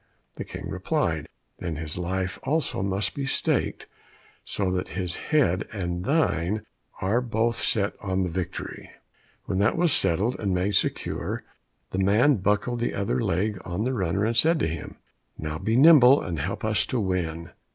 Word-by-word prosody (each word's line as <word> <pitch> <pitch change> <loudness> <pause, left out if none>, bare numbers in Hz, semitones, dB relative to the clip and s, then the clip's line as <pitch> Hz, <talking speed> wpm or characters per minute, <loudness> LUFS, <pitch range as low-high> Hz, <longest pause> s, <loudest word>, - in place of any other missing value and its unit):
The - - -6
King - - -7
replied, - - -1 0.3
"Then 85 -2 -3
his 75 0 -3
life 95 +1 -2
also 150 -6 -1
must 95 0 -1
be 140 -1 -3
staked, - - 0 0.6
so 95 -3 -2
that 90 0 -1
his 90 -2 -2
head 120 - +2
and 90 -4 -3
thine 105 - +1 0.4
are 105 +6 +2
both 115 -1 0
set 100 -1 +1
on 95 -1 0
the 90 - -1
victory." 90 +1 -5 0.6
When 95 - -1
that 105 +8 +2
was 170 -3 +3
settled 105 - +2
and 100 -3 0
made 95 +3 0
secure, - - -1 0.5
the 95 - -2
man 110 +8 +4
buckled 105 +5 0
the 120 - -1
other 95 -11 0
leg 100 +4 0
on 90 +4 -3
the 130 +2 0
runner, 95 -2 0
and 115 +1 0
said 160 +8 +4
to - - +2
him, 80 -1 -6 0.4
"Now 80 0 -4
be 110 +5 0
nimble, 140 -1 +8
and 85 -4 -4
help 95 +8 -3
us 110 -1 +2
to 125 - -1
win." 85 -4 -2
100 Hz, 170 wpm, -26 LUFS, 90-115 Hz, 0.6 s, nimble